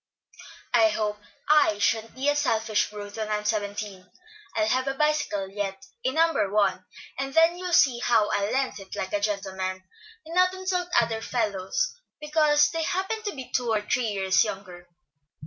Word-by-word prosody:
"I 225 -2 +5
hope 210 -1 -2 0.3
I 295 -9 +4
sha'n't 225 +2 0
be 265 +2 -2
a 290 - +3
selfish 220 -6 +1
brute 205 0 -8
when 215 -1 -3
I'm 210 0 -2
seventeen. 205 -3 -3 0.5
I'll 215 - +2
have 255 +3 +1
a 270 - -1
bicycle 300 -10 0
yet, 200 +4 -5 0.2
A, 260 - +1
No. 325 +3 +3 0.2
1, 195 -2 +1 0.3
and 270 0 -4
then 330 +1 +5
you'll 360 0 -5
see 260 -7 +4
how 225 -3 +3
I'll 200 +1 0
lend 265 -4 -1
it, 195 -1 -9
like 190 - -4
a 205 - +2
gentleman, 190 -2 -3 0.4
and 325 - -9
not 365 +1 +3
insult 370 -1 -2
other 225 -1 -1
fellows 215 - -1 0.3
because 300 -1 +3
they 330 - -2
happen 385 +6 -2
to 415 -5 -4
be 260 -2 -8
two 245 -2 0
or 215 -1 +1
three 240 +3 0
years 190 -2 +2
younger." 185 -4 -7
225 Hz, 175 wpm, -26 LUFS, 205-295 Hz, 0.5 s, I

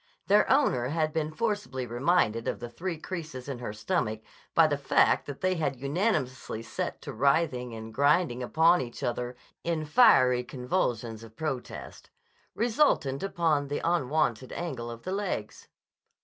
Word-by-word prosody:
Their 205 +2 +4
owner 195 - +3
had 155 +1 0
been 155 -1 -1
forcibly 205 - -2
reminded 120 -2 +1
of - - -2
the 120 0 -7
three 175 +5 -4
creases 155 -7 -6
in 135 -3 -5
her 120 -4 -4
stomach 110 - -2 0.3
by 165 - +7
the 150 -2 +1
fact 140 - +3
that 140 -1 -7
they 185 0 +2
had 160 -5 -1
unanimously 135 - -1
set 115 - -4
to - - -6
writhing 130 -2 +1
and 110 0 -8
grinding 145 0 +2
upon 165 +7 +4
each 120 -2 -7
other 120 +1 -2 0.3
in 165 -2 -1
fiery 130 - +5
convolutions 120 -4 -2
of 110 -1 -13
protest, 140 -4 -5 0.5
resultant 225 - +2
upon 165 -7 +1
the 145 - -2
unwonted 145 -6 0
angle 135 -9 -4
of 115 0 -8
the 185 - -4
legs. 190 - -3
140 Hz, 150 wpm, -28 LUFS, 120-170 Hz, 0.5 s, by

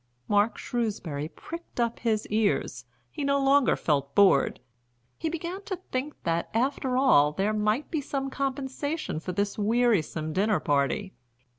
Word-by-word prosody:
Mark 205 +2 +2
Shrewsbury 185 -11 -3
pricked 335 - -9
up 235 -1 0
his 220 -2 0
ears, 200 - 0 0.3
he - - -4
no 280 0 +2
longer 275 0 +4
felt 140 -3 -1
bored, 195 -9 +4 0.6
he 325 - -3
began 340 +4 -4
to 400 -4 -3 0.2
think 265 +4 -2
that, 170 -1 -1
after 260 +1 0
all, 150 - +5
there 200 +5 0
might 215 +6 0
be 315 -4 0
some 270 0 -3
compensation 275 - -3
for 180 - -5
this 200 +3 -2
wearisome 205 -8 +1
dinner 205 +4 +2
party. 145 +7 0
225 Hz, 145 wpm, -27 LUFS, 185-275 Hz, 0.6 s, all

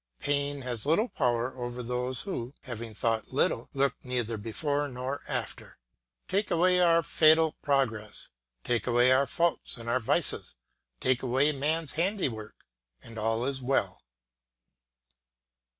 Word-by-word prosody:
Pain 145 0 -1
has 125 -1 -4
little 210 +10 +3
power 125 -2 0
over 120 -1 -5
those 125 +1 -2
who, 140 -9 -5
having 115 -4 -7
thought 115 0 0
little, - - +1
look 140 0 +2
neither 120 -3 -2
before 145 +8 -2
nor 130 +1 -4
after. - - -5 0.5
Take 200 +3 0
away 180 +1 +3
our 170 -1 +5
fatal 160 +1 +5
progress, 120 -7 -1 0.3
take 120 0 0
away 120 +1 +4
our 135 +2 +4
faults 170 +2 0
and 115 0 -9
our 125 +2 +2
vices, 115 - -1 0.4
take 130 -1 +1
away 130 +4 +2
man's 150 +2 -1
handiwork, 160 - -2 0.4
and 115 -1 -8
all 115 +2 0
is 135 -1 -2
well. 130 +2 0
130 Hz, 135 wpm, -29 LUFS, 120-150 Hz, 0.5 s, our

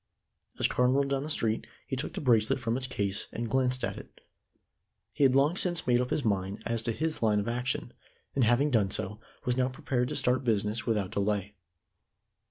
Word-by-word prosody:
As - - +3
Carne 125 0 +2
rolled 140 0 +2
down 135 -1 +1
the 150 - -5
street, 115 -7 0 0.2
he - - -3
took 130 - -4
the - - -4
bracelet 115 -3 +3
from 115 -1 -1
its 130 0 -2
case 100 -5 -2
and 115 0 -3
glanced 130 0 +1
at - - -2
it. - - -15 0.9
He - - +1
had 130 -1 +5
long 145 +5 +4
since 175 -3 0
made 125 -1 +3
up 125 - -2
his 145 - -1
mind 100 -2 -1
as 115 -1 -1
to 115 - -1
his 160 +6 -2
line 105 -2 +3
of 100 - -3
action, 120 - -2 0.4
and 135 - +2
having 120 +6 +3
done 105 -6 +3
so, 105 +1 -2 0.3
was 125 -1 +1
now 130 0 +2
prepared 130 -3 -1
to - - -3
start 125 +2 +1
business 110 -1 0
without 105 -5 0
delay. 100 0 -1
120 Hz, 205 wpm, -29 LUFS, 105-130 Hz, 0.9 s, had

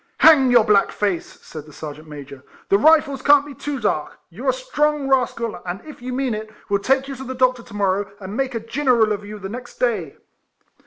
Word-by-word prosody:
" - - -42
Hang 290 -5 +7
your 240 -2 +6
black 210 -2 +3
face," 350 - -3
said 155 -1 -10
the - - -13
Ser 150 0 -7
geant 155 +2 -15
Major; 140 -2 -10
" - - -27
the 200 - +5
Kifles 300 +2 +4
can't 290 0 +6
be 290 - -9
too 285 0 -5
dark: 180 -9 -2
you 235 +11 -7
're - - +5
a - - +3
strong 295 +3 -1
rascal, 245 -4 0
and 180 +1 -5
if 305 -5 -11
you 250 +1 -5
mean 255 -1 -1
it, 215 0 -5 0.2
we 200 - +3
'11 - - -11
take 270 +2 +2
you 275 - -5
to 265 - -7
the 260 0 -6
doctor 255 -1 +2
to 230 - -15
morrow 200 0 0
and 195 +1 -7
make 265 -1 -2
a - - -1
Giniril 230 -1 +1
of 205 0 -5
you 210 +1 -8
the 195 -1 -7
next 240 +4 -8
day." 210 - -1
240 Hz, 250 wpm, -21 LUFS, 200-270 Hz, 0.2 s, Hang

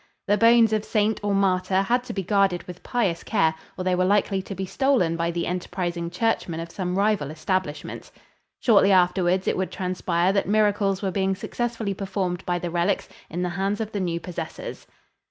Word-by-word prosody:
The 205 - +3
bones 230 0 +5
of 215 -1 +1
saint 215 0 +1
or 205 -1 +1
martyr 190 0 +2
had 245 +5 +1
to - - -5
be 195 - -2
guarded 195 -2 +2
with 180 -1 -10
pious 205 -9 -1
care 160 0 +2 0.2
or 185 - -3
they 185 0 +1
were 180 0 +2
likely 195 0 +2
to 195 +1 -7
be 190 - -3
stolen 240 -7 +1
by 170 0 -1
the 170 0 -2
enterprising 175 -1 -3
churchmen 180 -3 -1
of 165 0 -6
some 180 0 -3
rival 200 -8 +1
establishment. 155 0 -3 0.5
Shortly 200 -4 +5
afterwards, 180 0 +3
it - - +2
would 190 0 -1
transpire 180 -1 0
that 200 - +1
miracles 205 -1 +2
were 190 - 0
being 190 0 0
successfully 230 0 -3
performed 190 -2 -3
by 175 0 +1
the 175 -1 -4
relics 175 +3 0 0.2
in 175 +3 -3
the 180 - -1
hands 195 +3 -1
of 220 -1 -3
the 205 - -3
new 170 -3 -1
possessors. 170 -2 -7
190 Hz, 190 wpm, -24 LUFS, 175-205 Hz, 0.5 s, bones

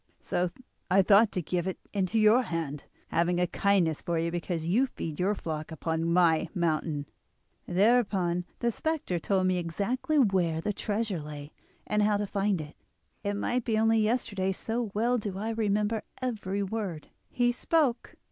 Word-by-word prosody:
So 180 0 0 0.4
I 195 +1 +5
thought 210 +2 +6
to 180 - -2
give 175 +3 -1
it 190 - -3 0.2
into 200 +1 0
your 215 +3 +6
hand, 160 - -4 0.2
having 175 +1 +1
a 180 - +3
kindness 175 -4 +1
for 170 -2 -1
you 165 +1 0
because 170 -1 -3
you 235 +10 +3
feed 160 - -6
your 195 +3 +2
flock 155 -3 -5
upon 160 +1 -1
my 170 -2 +3
mountain.' 155 -4 0 0.6
"Thereupon 190 -3 +2 0.2
the 235 -1 +2
spectre 310 - -2
told 190 +2 +1
me 185 -1 +2
exactly 205 - -1
where 185 - +2
the 205 +5 -2
treasure 210 -2 -2
lay, 145 0 -8 0.3
and 210 0 +1
how 210 0 +3
to 205 - -1
find 200 -2 0
it. 150 0 -8 0.5
It 205 0 -1
might 245 +4 -1
be 220 -2 0
only 225 +1 +4
yesterday 210 -4 0
so 225 +3 -3
well 240 +3 +2
do 200 -3 -4
I 220 +3 -2
remember 210 0 0 0.2
every 205 -6 -2
word 195 -6 -4 0.2
he 245 -1 +2
spoke. 265 0 0
195 Hz, 165 wpm, -29 LUFS, 170-220 Hz, 0.6 s, thought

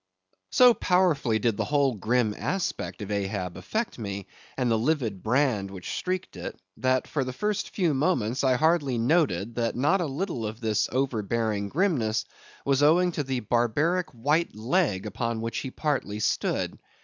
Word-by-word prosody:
So 250 -1 +7
powerfully 175 - +2
did 110 -1 0
the - - 0
whole 140 -3 +2
grim 110 +1 +1
aspect 185 - -3
of 105 - -6
Ahab 100 -3 -2
affect 220 - -3
me, 100 -3 -4 0.3
and 125 -3 +1
the - - +4
livid 120 - 0
brand 110 -4 +1
which 95 -2 -7
streaked 185 - -3
it, 85 - -6 0.2
that 130 0 +1
for 140 - -1
the 130 - -4
first 210 +10 -2
few 175 -6 +1
moments 130 -5 +1
I 130 -1 +4
hardly 150 -3 +2
noted 115 - +1
that 115 -1 0
not 150 +10 +2
a 170 - 0
little 145 - -3
of 110 +2 -7
this 110 -3 0
overbearing 110 -5 -1
grimness 140 - +1 0.4
was 140 0 +2
owing 175 +5 +5
to 160 - -2
the 130 -2 -2
barbaric 135 - +1
white 145 +6 0
leg 110 - 0
upon 115 +2 -2
which 115 0 -3
he 135 - -4
partly 130 -8 -2
stood. 105 - -1
125 Hz, 165 wpm, -27 LUFS, 110-155 Hz, 0.4 s, So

